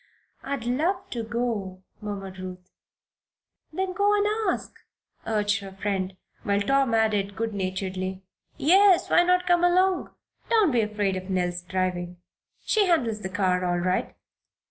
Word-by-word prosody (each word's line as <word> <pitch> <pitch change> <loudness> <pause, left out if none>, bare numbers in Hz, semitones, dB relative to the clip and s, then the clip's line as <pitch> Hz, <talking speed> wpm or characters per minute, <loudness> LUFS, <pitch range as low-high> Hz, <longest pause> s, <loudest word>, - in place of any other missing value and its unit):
"I'd 275 -4 -4
love 310 +11 -1
to 235 - -3
go," 220 -5 -3 0.2
murmured 195 -3 -6
Ruth. 185 -1 -9 1.0
"Then 375 +3 -2
run 410 +1 +2
and 430 +1 +1
ask," - - -5 0.5
urged 205 -2 +1
her 195 -1 -9
friend, 190 -1 -3 0.2
while 200 0 +1
Tom 270 +2 +2
added, 205 -3 +1
good 225 0 -2
naturedly: 185 -1 -3 0.3
"Yes, 375 +4 +5
why - - +6
not 360 +1 +2
come 350 -1 +3
along? 365 +1 +3 0.4
Don't 435 -8 +4
be 240 -3 +3
afraid 210 -2 -1
of 185 +1 -7
Nell's 180 -1 -1
driving. 180 -1 -2 0.5
She 420 -3 +3
handles 235 -11 +1
the 190 - -4
car 185 -1 +1
all 175 -1 +1
right." 180 +1 -1
210 Hz, 145 wpm, -26 LUFS, -, 1.0 s, why